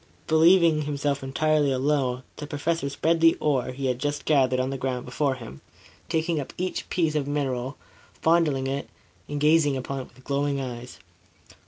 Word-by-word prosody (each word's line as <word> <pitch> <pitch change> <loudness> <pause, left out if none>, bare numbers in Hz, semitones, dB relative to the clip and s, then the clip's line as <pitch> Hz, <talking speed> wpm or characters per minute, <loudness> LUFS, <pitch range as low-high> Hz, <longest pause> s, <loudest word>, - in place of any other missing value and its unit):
Believing 165 0 +5
himself 145 -1 -1
entirely 145 +2 +1
alone, 130 -1 0
the 150 - -6
Professor 145 0 -1
spread 165 +4 0
the 165 0 +6
ore 140 -5 0
he 130 +2 -5
had 125 -1 0
just 145 +2 -2
gathered 130 -4 +3
on 130 +1 -1
the 135 - -3
ground 125 -1 -2
before 140 -3 0
him, 115 - -10 0.5
taking 160 0 0
up 140 - -6
each 185 +1 -3
piece 165 -4 +1
of 150 -2 -1
mineral, 135 -2 -2 0.4
fondling 160 -5 +2
it 135 +1 -3 0.4
and 145 0 -3
gazing 150 -2 +4
upon 135 +1 -4
it 130 - -7
with 130 - -20
glowing 140 0 -1
eyes. 125 -2 -6
140 Hz, 170 wpm, -25 LUFS, 130-155 Hz, 0.5 s, the